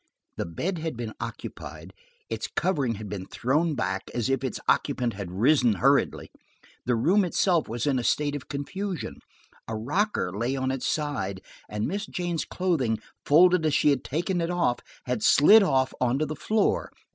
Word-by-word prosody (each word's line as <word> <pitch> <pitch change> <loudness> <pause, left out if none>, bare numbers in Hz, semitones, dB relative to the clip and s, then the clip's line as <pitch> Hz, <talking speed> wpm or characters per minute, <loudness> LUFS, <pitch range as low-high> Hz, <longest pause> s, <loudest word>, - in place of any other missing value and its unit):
The - - -3
bed 170 - -3
had 155 -6 -4
been 115 -2 -5
occupied; - - -7 0.3
its - - -3
coverings 135 - 0
had 105 0 -7
been 95 -2 -6
thrown 150 +6 0
back, 95 -3 -2
as 120 +2 0
if 135 0 0
its 130 - -3
occupant 120 -2 +1
had 100 -2 -6
risen 120 +4 +3
hurriedly. 95 - +1 0.6
The 125 - +3
room 180 - +3
itself 175 -1 +1
was 115 +1 -2
in 135 -3 +2
a - - -3
state 145 +3 +1
of 145 - -7
confusion; 180 +6 -4 0.5
a 110 - -3
rocker 130 - -1
lay 120 +5 -1
on 130 -1 -1
its 130 -2 -2
side, 125 -12 -2 0.3
and 105 0 -2
Miss 200 +4 -3
Jane's 175 -3 -2
clothing, 155 -12 0 0.3
folded 175 +3 +6
as 155 -2 +2
she 150 - +4
had 140 - 0
taken 175 +5 -1
it 165 - -1
off, 175 -9 +1 0.3
had 125 -3 -2
slid 200 - +7
off 130 -9 +2
on 125 +1 +2
to 155 - 0
the 155 +1 -5
floor. 215 +8 0
140 Hz, 180 wpm, -26 LUFS, 115-170 Hz, 0.6 s, slid